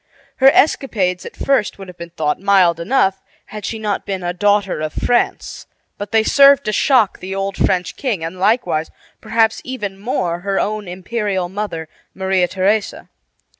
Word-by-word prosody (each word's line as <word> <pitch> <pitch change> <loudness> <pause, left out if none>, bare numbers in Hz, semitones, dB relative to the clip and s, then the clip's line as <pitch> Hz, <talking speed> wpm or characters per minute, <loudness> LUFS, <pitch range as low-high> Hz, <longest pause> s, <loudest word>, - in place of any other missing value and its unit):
Her 270 0 +7
escapades 205 - +1
at - - -11
first 275 -6 0
would 195 -1 -10
have 180 - -11
been 170 0 -9
thought 155 -3 -2
mild 185 -4 +3
enough 190 0 +1 0.2
had 210 -1 -8
she 225 - -3
not 210 -2 -2
been 190 -2 -4
a 175 0 -2
"daughter 205 -1 +1
of 155 0 -3
France"; 240 0 -1 0.3
but 205 0 -6
they 220 -1 +3
served 280 +3 +5
to 215 - 0
shock 225 -2 +2
the 190 +1 -6
old 195 0 -3
French 180 -1 0
king, 225 -11 -2
and 165 +3 -6
likewise, 185 -6 +1 0.3
perhaps 225 0 +1
even 210 -7 -5
more, 190 -6 -2
her 195 +2 -1
own 210 -1 -2
imperial 190 0 -3
mother, 190 -5 -5 0.3
Maria 190 -1 +1
Theresa. 195 +3 -1
195 Hz, 170 wpm, -18 LUFS, 180-215 Hz, 0.3 s, Her